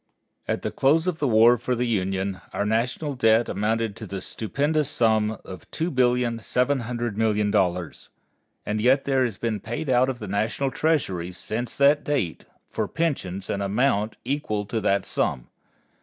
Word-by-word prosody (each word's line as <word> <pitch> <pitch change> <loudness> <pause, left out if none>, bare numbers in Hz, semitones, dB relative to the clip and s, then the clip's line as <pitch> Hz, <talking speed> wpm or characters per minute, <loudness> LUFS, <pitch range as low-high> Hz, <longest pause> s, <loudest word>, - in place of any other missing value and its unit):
At - - -2
the - - -2
close 155 +5 +3
of 180 -3 -1
the 145 - +1
War 115 +1 +5
for 125 +2 -1
the 120 +1 0
Union 95 -3 -1
our 100 - -1
national 125 +7 -1
debt 115 -2 +3
amounted 110 0 -1
to 110 - -7
the 95 +1 -5
stupendous 145 +9 -1
sum 110 -4 +2
of 95 - -10
$2,700,000,000. 115 - 0 0.6
And 105 +1 -1
yet 130 +4 +3
there 135 -2 +2
has 115 -6 -2
been 110 -1 -2
paid 120 +5 -4
out 125 +1 +4
of 130 - -3
the 105 - -7
National 110 +7 -1
Treasury, 115 - 0
since 110 +6 -4
that 145 +1 +4
date, 135 - -2 0.2
for - - -2
pensions 100 - -2
an 100 - -2
amount 105 +1 +1
equal 120 -6 -2
to 110 +2 -2
that 100 -1 +1
sum. - - -1
115 Hz, 155 wpm, -25 LUFS, 105-130 Hz, 0.6 s, War